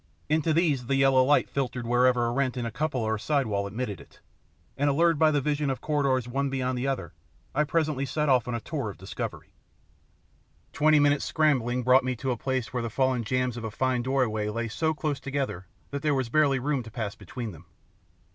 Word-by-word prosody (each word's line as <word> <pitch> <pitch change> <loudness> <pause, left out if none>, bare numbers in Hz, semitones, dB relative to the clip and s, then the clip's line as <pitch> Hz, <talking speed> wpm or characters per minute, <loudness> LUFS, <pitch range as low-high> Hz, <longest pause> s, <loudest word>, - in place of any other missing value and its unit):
Into 160 +1 +2
these 155 -7 +1
the 135 - +1
yellow 135 -1 +5
light 145 +3 +3
filtered 125 -3 -3
wherever 125 0 +3
a 120 - 0
rent 130 0 0
in 120 - -2
a 115 - -3
cupola 135 -4 -1
or 110 0 0
side 140 +2 +1
wall 100 -2 -1
admitted 105 -1 -4
it, - - -18 0.6
and 145 +1 +1
allured 165 +2 +3
by 160 - +5
the 145 -2 +1
vision 145 0 0
of 135 - -2
corridors 135 -5 0
one 135 +3 -1
beyond 130 -1 -1
the 125 +2 -2
other, 135 -1 -3 0.4
I 150 +2 +2
presently 150 -3 0
set 150 +2 -1
off 130 -4 +3
on 120 - -2
a - - -2
tour 135 -2 -4
of 100 - -9
discovery. - - -6 1.2
Twenty 155 +1 +4
minutes' 145 0 +3
scrambling 125 -6 +1
brought 130 +2 +5
me 130 0 -1
to 130 +2 -2
a - - 0
place 130 0 -3
where 125 - -1
the 115 - -3
fallen 130 +1 +1
jambs 125 +1 -1
of 120 - -6
a 110 - -3
fine 130 +3 0
doorway 120 -5 0
lay 115 +2 -3
so 160 +7 0
close 145 -1 -2
together 135 -11 -3 0.2
that 140 - -3
there 150 -1 +1
was 130 -3 -1
barely 145 0 +3
room 140 +1 -1
to 115 - -10
pass 110 -2 -4
between 120 -4 -7
them. 85 0 -14
130 Hz, 215 wpm, -27 LUFS, 120-145 Hz, 1.2 s, yellow